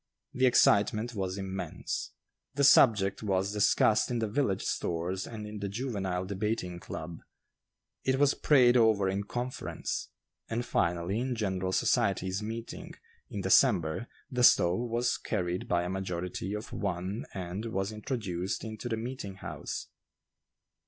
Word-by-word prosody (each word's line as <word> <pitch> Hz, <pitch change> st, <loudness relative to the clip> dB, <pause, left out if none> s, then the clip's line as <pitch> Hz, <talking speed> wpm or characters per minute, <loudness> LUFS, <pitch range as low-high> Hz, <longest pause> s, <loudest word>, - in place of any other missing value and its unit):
The 130 Hz, 0 st, +3 dB
excitement 110 Hz, 0 st, +4 dB
was 95 Hz, -2 st, -3 dB
immense. 95 Hz, -1 st, -4 dB, 0.5 s
The 140 Hz, -, +1 dB
subject 105 Hz, -8 st, +5 dB
was 100 Hz, -1 st, 0 dB
discussed 105 Hz, +1 st, +3 dB
in 120 Hz, -, -1 dB
the 115 Hz, -1 st, 0 dB
village 105 Hz, -3 st, 0 dB
stores 90 Hz, +3 st, -2 dB
and 110 Hz, -2 st, -7 dB
in 105 Hz, 0 st, -7 dB
the 100 Hz, 0 st, -3 dB
juvenile 100 Hz, -5 st, -2 dB
debating 100 Hz, -2 st, -2 dB
club; 80 Hz, -1 st, -7 dB, 0.8 s
it 130 Hz, 0 st, +2 dB
was 145 Hz, 0 st, +4 dB
prayed 125 Hz, -4 st, +5 dB
over 110 Hz, -5 st, +4 dB
in 100 Hz, +1 st, -1 dB
conference; 125 Hz, +4 st, -4 dB, 0.4 s
and 120 Hz, +1 st, -2 dB
finally 85 Hz, +1 st, 0 dB
in 125 Hz, 0 st, -1 dB
general 95 Hz, -4 st, -1 dB
"society's 95 Hz, -3 st, +1 dB
meeting," 115 Hz, +2 st, -6 dB, 0.3 s
in 100 Hz, -, -4 dB
December, 90 Hz, +1 st, +3 dB, 0.2 s
the 125 Hz, -1 st, 0 dB
stove 95 Hz, +2 st, +5 dB
was 120 Hz, +1 st, 0 dB
carried 90 Hz, -4 st, -2 dB
by 85 Hz, 0 st, +1 dB
a -, -, -3 dB
majority 90 Hz, +1 st, -3 dB
of 105 Hz, -, -7 dB
one 95 Hz, +2 st, -3 dB
and 95 Hz, +3 st, -4 dB
was 95 Hz, -2 st, -2 dB
introduced 105 Hz, -4 st, -3 dB
into 110 Hz, +2 st, -6 dB
the 115 Hz, -, -1 dB
meeting 115 Hz, -4 st, -5 dB
house. 95 Hz, -, -6 dB
100 Hz, 140 wpm, -30 LUFS, 95-115 Hz, 0.8 s, subject